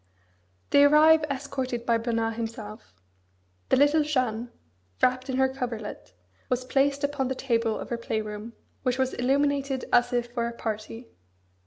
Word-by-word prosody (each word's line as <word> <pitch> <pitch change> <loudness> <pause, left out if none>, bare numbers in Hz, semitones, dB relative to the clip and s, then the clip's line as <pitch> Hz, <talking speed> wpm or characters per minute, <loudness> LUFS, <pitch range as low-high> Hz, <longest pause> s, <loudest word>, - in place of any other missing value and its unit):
They 285 - +7
arrive 305 +2 +6
escorted 260 -3 -3
by 230 -1 +2
Bernard 225 -1 -1
himself. 225 - -7 0.8
The - - +4
little 290 +3 +4
Jeanne, 250 -6 -1 0.5
wrapped 255 +1 +1
in 260 - -1
her 265 0 +4
coverlet, 235 - -6 0.4
was 255 0 -1
placed 280 +2 +1
upon 285 -2 0
the 260 - -2
table 230 -4 0
of - - -7
her 235 - -2
play 220 -1 -2
room, 210 +2 -7 0.3
which 250 -1 0
was 260 -1 0
illuminated 275 +1 0
as 245 - +4
if 240 -1 -1
for 235 -1 -1
a 235 - -5
party. 225 +1 -6
250 Hz, 155 wpm, -26 LUFS, 230-275 Hz, 0.8 s, They